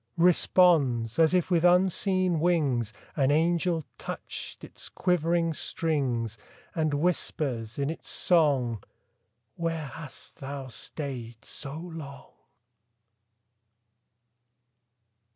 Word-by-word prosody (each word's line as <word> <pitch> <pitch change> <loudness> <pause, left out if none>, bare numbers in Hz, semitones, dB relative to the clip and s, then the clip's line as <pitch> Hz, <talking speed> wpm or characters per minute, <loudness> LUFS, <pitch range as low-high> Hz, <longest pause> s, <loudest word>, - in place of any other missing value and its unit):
Responds, 165 -9 +4
as 160 -1 +6
if 180 0 +1
with 170 -2 +3
unseen 185 0 +3
wings, 145 -10 +1 0.2
An 135 -3 +3
angel 165 +2 +2 0.2
touched - - -6
its - - -8
quivering 170 -2 +1
strings; 125 -10 -1 0.3
And 155 -3 0
whispers, 140 -8 -1
in 140 +1 0
its 165 - -7
song, 135 - +2 0.7
"'Where 165 -2 -2
hast 150 -2 -9
thou 135 -1 -6
stayed 120 -4 -6
so 140 +3 -6
long?" 160 -5 -8
155 Hz, 90 wpm, -28 LUFS, 135-170 Hz, 0.7 s, as